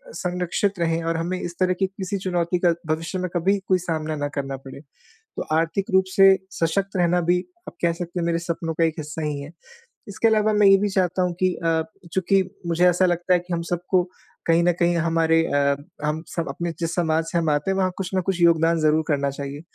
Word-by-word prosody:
संरक्षित 180 +2 -1
रहें 165 0 0
और 165 0 0
हमें 175 +3 -2
इस 175 0 -5
तरह 185 -1 +3
की 195 - +3
किसी 190 +1 -4
चुनौती 180 -1 0
का 170 - +5
भविष्य 165 +4 -2
में 185 0 -2
कभी 190 +4 +2
कोई 185 - +4
सामना 160 -3 -3
ना 145 0 -1
करना 135 -1 -3
पड़े। 135 0 -11 0.4
तो 445 0 -9
आर्थिक 165 +4 0
रूप 190 0 +5
से 195 - +8 0.3
सशक्त 190 +4 -1
रहना 175 0 +2
भी, 175 +1 +2 0.3
आप - - -9
कह 170 -1 +3
सकते 175 +1 -5
हैं, - - -1
मेरे 170 0 +1
सपनों 165 -1 -3
का 165 - +2
एक 160 -1 +1
हिस्सा 150 +1 -5
ही 150 -2 -2
है। 140 +3 -9 0.6
इसके 200 +3 +1
अलावा 215 -1 +2
मैं 210 -1 +5
ये 195 0 +7
भी 205 +1 0
चाहता 185 -1 0
हूँ 180 -1 -1
कि 185 -1 +3
अ, 165 -1 0 0.3
चूँकि 190 +1 +2 0.2
मुझे 170 +1 +3
ऐसा 180 +1 +3
लगता 175 +1 +1
है 180 - +4
कि 175 0 -6
हम 170 - -1
सबको 180 +1 +1 0.4
कहीं 165 +1 +4
न 175 - +4
कहीं 175 0 +3
हमारे 165 0 +2
अ, 140 -1 +2 0.3
हम 155 +1 -2
सब 170 +1 -2
अपने 170 0 -3
जिस 165 -1 -2
समाज 160 -2 +1
से - - 0
हम 165 -2 0
आते 145 +6 0
हैं, 190 - -1
वहाँ 185 -1 +1
कुछ 190 -2 -3
न 185 - +2
कुछ 180 0 -2
योगदान 165 -1 +4
ज़रूर 155 +1 +3
करना 140 -2 +1
चाहिए। 140 +1 -6
170 Hz, 230 wpm, -23 LUFS, 160-185 Hz, 0.6 s, से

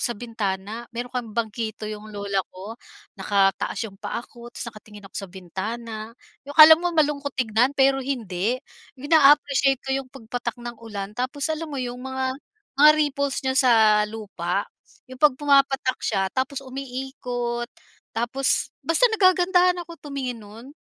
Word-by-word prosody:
sa 240 - -1
bintana. 220 0 -4
Meron 245 +2 -6
kaming 235 -3 -5
bangkito 220 -1 -3
yung 215 0 -7
lola 200 -2 -2
ko, 190 +4 -9 0.5
nakataas 195 -1 +1
yung 195 -2 -10
paa 235 - -4
ko 240 0 -13
tas 240 - -7
nakatingin 210 -1 -14
ako 195 - -13
sa 195 - -8
bintana 215 +5 -6 0.3
yung 285 - -8
akala 315 +1 +10
mo 350 -1 -2
malungkot 285 -3 0
tignan 245 +3 +1
pero 270 0 +4
hindi. 235 -5 -2 0.4
Yung 285 +5 -7
naa-appreciate 280 -3 +5
ko 270 - -2
yung 270 -1 -2
pagpatak 245 -2 -5
ng 240 -1 -8
ulan. 210 -3 -6
Tapos 255 +5 -3
alam 320 +1 -5
mo 290 - -6
yung 250 -1 -4
mga 260 0 -2 0.5
mga 300 +1 +10
ripples 280 -3 0
niya 265 - +1
sa 260 -2 +4 0.4
lupa 200 -3 -3 0.4
yung 255 0 -13
'pag 290 -4 +5
pumapatak 275 -2 +2
siya 190 -1 -1
tapos 270 +1 -2
umiikot 250 -2 -4 0.5
tapos 250 +4 0
basta 330 +8 +2
nagagandahan 365 -2 +4
ako 335 -1 -12
tumingin 265 -5 -5
nun. 225 +6 -12
245 Hz, 150 wpm, -24 LUFS, 215-275 Hz, 0.5 s, akala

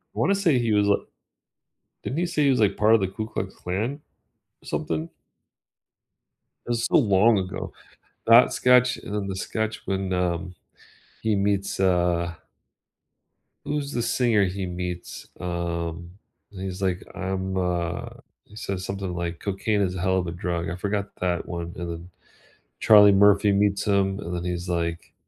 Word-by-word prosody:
I - - -5
wanna 200 - +3
say 165 -10 +2
he 115 -2 +1
was 105 0 +3
li 100 - +4 1.1
Didn't 140 - -3
he 175 - +1
say 155 -3 0
he - - +4
was 125 - +1
like 105 - +2
part 110 +2 +5
of 110 - +2
the 95 - +1
Ku 110 +3 -5
Klux 95 -3 -4
Klan 110 +11 -3 0.6
or - - -19
something? 80 0 -3 1.6
It's 120 -1 0
so - - +3
long 105 -2 +4
ago. 95 -1 -4 0.5
That 115 +2 +7
sketch 125 0 +4
and 105 - -8
then 100 -2 -2
the 95 - -4
sketch 110 +3 -3
when, 95 -1 -2
um, 90 0 -1 0.7
he 110 -2 +1
meets, 100 -1 0
uh 85 -2 +1 1.3
Who's 145 -1 -3
the 120 - -1
singer 115 -3 +2
he 95 +1 -3
meets? 90 -1 -6
Um, 85 -1 -4 0.4
and 95 -3 -9
he's 95 0 -5
like, 95 -2 -1
I'm, 95 -1 -3
uh, 90 -1 -1 0.4
he 105 - -17
says 95 -3 -4
something 95 -2 -4
like 85 -1 -3
cocaine 100 +1 0
is 90 -1 -1
a 90 - -4
hell 95 +1 +2
of 90 - -1
a - - -3
drug. 85 -1 -3
I 90 - -4
forgot 100 +1 -3
that 90 -2 -1
one. 85 -1 -5
And 85 -1 -5
then 85 +2 -8 0.7
Charlie 105 -2 +7
Murphy 100 +1 +5
meets 100 0 +1
him 100 -1 +1
and 90 -1 -5
then 85 - -3
he's 90 0 -3
like, 85 -1 -3
95 Hz, 170 wpm, -25 LUFS, 90-105 Hz, 1.6 s, That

